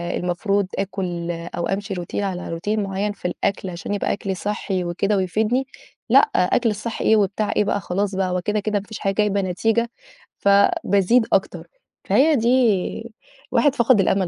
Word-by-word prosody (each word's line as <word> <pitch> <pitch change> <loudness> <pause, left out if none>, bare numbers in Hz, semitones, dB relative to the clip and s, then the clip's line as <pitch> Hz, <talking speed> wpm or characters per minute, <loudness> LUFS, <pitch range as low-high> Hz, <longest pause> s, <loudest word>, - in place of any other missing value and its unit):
المفروض 195 +3 0
آكُل 180 -3 -3
أو 170 0 -4
أمشي 195 +1 -3
routine 175 -2 -6
على 180 -4 -3
routine 210 +4 -1
معيّن 200 +1 -2
في 200 - -5
الأكل 190 +2 -2
عشان 180 +3 -5
يبقى 205 - 0
أكلي 195 -2 -3
صحّي 195 -2 -2
وكده 195 +4 0
ويفيدني 220 +8 0 0.4
لأ، - - +8 0.2
أكل 235 - +2
الصحّي 220 +2 -4
إيه 220 - +5
وبتاع 205 0 0
إيه - - +3
بقى 205 - 0
خلاص 195 +2 -2
بقى 190 -1 0
هو 180 0 -1
كده، 210 +3 -1
كده 210 0 -1
ما 200 - -11
فيش 220 - -8
حاجة 195 -1 0
جايبة 205 -1 +1
نتيجة، 225 +5 0 0.5
فبازيد 200 - +3
أكتر، 195 - 0 0.4
فهي 300 +3 +4
دي 230 -2 +1 0.4
الواحد 290 -2 +3
فقد 235 -3 +4
الأمل 190 0 +2
200 Hz, 170 wpm, -22 LUFS, 185-220 Hz, 0.5 s, لأ